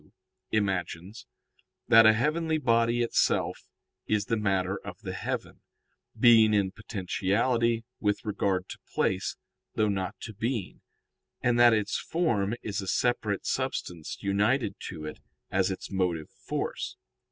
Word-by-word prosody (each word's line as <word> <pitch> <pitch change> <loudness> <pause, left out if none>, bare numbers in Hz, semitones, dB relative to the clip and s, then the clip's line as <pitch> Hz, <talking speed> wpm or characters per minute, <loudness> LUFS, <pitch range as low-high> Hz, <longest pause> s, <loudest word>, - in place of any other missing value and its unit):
] - - -54
imagines, 95 - -4 0.6
that 115 -2 +8
a 110 - +7
heavenly 155 +7 +1
body 115 -3 +2
itself 115 - +1 0.4
is 105 -2 +1
the 115 - 0
matter 95 -2 0
of - - -8
the - - -5
heaven - - -4 0.6
being 110 -3 +7
in 100 -2 +2
potentiality 115 +4 0 0.2
with 105 +3 0
regard 100 -3 0
to - - -9 0.2
place, 95 0 0 0.4
though 110 -1 +2
not 95 -2 -2
to 110 - -7
being, 110 -1 -3 0.6
and 120 -1 +3
that 120 0 +8
its 105 -2 +1
form 120 - 0
is 100 -2 -2
a 95 - -7
separate 110 -3 0
substance 85 -3 -3
united 105 +3 +1
to 80 -4 -7
it 75 - -7 0.3
as 95 0 +2
its 95 - -5
motive 90 -5 -1
force. - - -4
105 Hz, 135 wpm, -28 LUFS, 95-115 Hz, 0.6 s, that